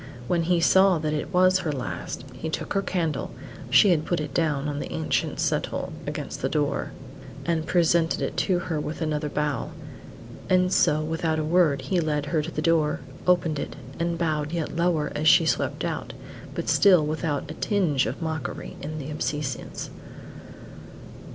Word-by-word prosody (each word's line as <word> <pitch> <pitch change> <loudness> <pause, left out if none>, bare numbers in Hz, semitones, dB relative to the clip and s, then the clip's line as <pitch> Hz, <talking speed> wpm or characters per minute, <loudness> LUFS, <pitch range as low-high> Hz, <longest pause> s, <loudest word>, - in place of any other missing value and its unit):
When 175 -1 +2
he 175 +1 +2
saw 190 +2 +5
that 155 -1 -2
it 150 - -3
was 185 0 +4
her 165 -5 -2
last, 130 -1 -5
he 130 +6 -5
took - - -3
her 195 - +2
candle 165 -7 -1 0.4
(she 200 - +6
had 160 -3 +2
put 175 +1 -1
it 150 -2 -4
down 150 -4 +1
on 145 -1 -3
the - - -5
ancient 80 0 -1
settle - - -1
against - - -5
the - - 0
door), 145 -2 0 0.6
and 165 -2 0
presented 170 -1 +3
it - - -2
to 185 -3 +2
her 165 -3 -2
with 150 +1 -4
another 150 -2 -1
bow. 150 -2 -1 0.8
And 185 0 +3
so 155 +1 +3
without 160 0 -1
a 155 - 0
word 160 -3 +3
he 185 - 0
led 150 -3 0
her 155 +2 0
to 155 - -5
the - - -3
door, 160 -4 +2 0.3
opened 165 -4 +3
it, - - -5 0.2
and 170 0 0
bowed 155 -3 -1
yet 165 -2 -3
lower 170 -3 +1
as 155 +1 0
she 170 0 +7
swept - - 0
out, - - -4 0.4
but - - -3
still 180 -6 +5
without 155 -1 -2
a - - -5
tinge 160 -8 +1
of - - -4
mockery 160 -1 -4
in 155 +2 -5
the 150 0 -5
obeisance. 145 -2 -3
160 Hz, 175 wpm, -25 LUFS, 150-175 Hz, 0.8 s, she